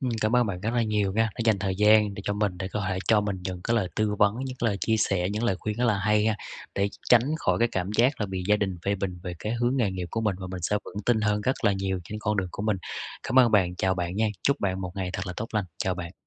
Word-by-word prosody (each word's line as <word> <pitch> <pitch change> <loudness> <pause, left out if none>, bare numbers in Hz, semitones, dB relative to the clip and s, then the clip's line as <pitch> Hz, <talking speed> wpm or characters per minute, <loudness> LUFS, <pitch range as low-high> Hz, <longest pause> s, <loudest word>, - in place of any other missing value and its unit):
Ừm, 130 -3 -1
cảm 110 +3 +2
ơn 120 -2 +4
bạn 90 -3 -4
rất 110 - -1
là 120 - +3
nhiều 105 -3 0
nha 110 +1 +2
đã - - -19
dành 110 -4 +3
thời 95 -1 -2
gian 105 0 +5
để 100 - -7
cho 100 - 0
mình 100 -3 -1
để 95 0 -3
có 105 -2 -2
thể 95 -1 -1
cho 110 -2 +5
mình 100 -2 -2
những 90 -2 -4
cái 115 - +1
lời 100 -5 +1
tư 105 -1 +1
vấn, 105 +1 +4
những 130 -1 -5
cái 115 - +1
lời 100 - -1
chia 110 -1 +2
sẻ, 95 -4 +1
những 110 +3 -2
lời 95 -5 +1
khuyên 105 -1 -3
rất 125 - +1
là 105 -4 +2
hay 105 +1 +2
ha 110 -1 +2 0.4
để 100 +1 +1
tr - - -14 0.2
tránh 120 -1 +7 0.2
khỏi - - +1
cái 120 0 +3
cảm 95 +1 -1
giác 125 +1 +3
là 105 - 0
bị 95 -1 -4
gia 105 - +5
đình 95 -4 -2
phê 100 +1 +1
bình 95 -2 -4
về 90 - -4
cái 105 +6 -3
hướng 120 +2 +1
nghề 115 -7 +2
nghiệp 90 -2 -4
của 115 - -2
mình, 105 -4 0
và 95 - -5
mình 90 -2 -6
sẽ 105 +4 +1
vững 105 - -7
tin 115 -3 +3
hơn 105 0 +1
rất 130 +5 -1
là 100 - +5
nhiều 95 -1 -1
trên 105 +3 -6
con 105 0 -1
đường 95 -2 -1
của 100 - -5
mình. 105 -2 +1 0.5
Cảm 130 - +2
ơn 125 -2 +6
bạn, 90 -4 +3
chào 95 +1 +1
bạn 90 0 -3
nha. 110 +1 +2
Chúc 140 +1 +2
bạn 95 -1 -1
một 90 - -4
ngày 95 -2 -3
thật 95 +1 -4
là 90 - -4
tốt 115 - -4
lành. 105 -2 +1
Chào 95 -1 0
bạn. 90 -1 -6
105 Hz, 320 wpm, -26 LUFS, 95-110 Hz, 0.5 s, tránh